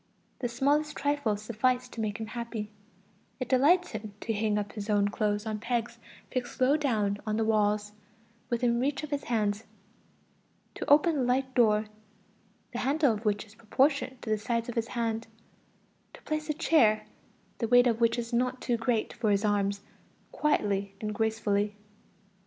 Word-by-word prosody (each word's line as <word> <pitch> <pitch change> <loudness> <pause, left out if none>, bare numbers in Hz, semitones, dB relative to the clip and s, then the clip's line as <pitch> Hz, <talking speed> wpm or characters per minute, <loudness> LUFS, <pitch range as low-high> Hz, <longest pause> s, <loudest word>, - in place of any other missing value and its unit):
The 245 - -2
smallest 290 +5 +1
trifles 275 -8 0
suffice 250 +3 0
to 230 - -6
make 210 -2 -2
him 220 - -3
happy; 225 -2 -5 0.7
it 255 - -3
delights 320 +8 +4
him 215 -2 -7
to 225 - -1
hang 210 0 0
up 205 -1 -3
his 210 -1 -7 0.2
clothes 210 0 -1
on 215 -1 -3
pegs 235 +1 -2 0.3
fixed 250 -2 -4
low 260 +3 +4
down 215 -9 0
on 215 -1 -1
the 225 - +1
walls, 210 -1 +1 0.6
within 235 0 +1
reach 275 +3 -1
of 305 - -6
his 285 -1 -2
hands; 215 -2 0 1.1
to - - -5
open 305 +2 +5
a - - +2
light 260 +1 0
door, 215 -4 +4 0.9
the 240 - -3
handle 280 -1 +2
of 215 +1 -7
which 205 0 0
is 210 - -18
proportioned 260 +4 +1
to 220 - -3
the 215 - +1
size 230 +1 -1
of 240 - -4
his 230 0 -1
hand; 225 -1 -1 0.9
to - - -16
place 310 0 -3
a - - +2
chair, 225 -10 +3 0.5
the 230 - 0
weight 245 +1 +6
of 235 -1 +1
which 230 +1 +3
is 235 0 -4
not 250 +2 +1
too 240 -2 0
great 230 -1 0
for 225 -2 -1
his 200 +1 +2
arms, 200 -1 +1 0.5
quietly 200 -9 0
and 210 0 -3
gracefully. 210 -2 0
230 Hz, 170 wpm, -29 LUFS, 210-255 Hz, 1.1 s, weight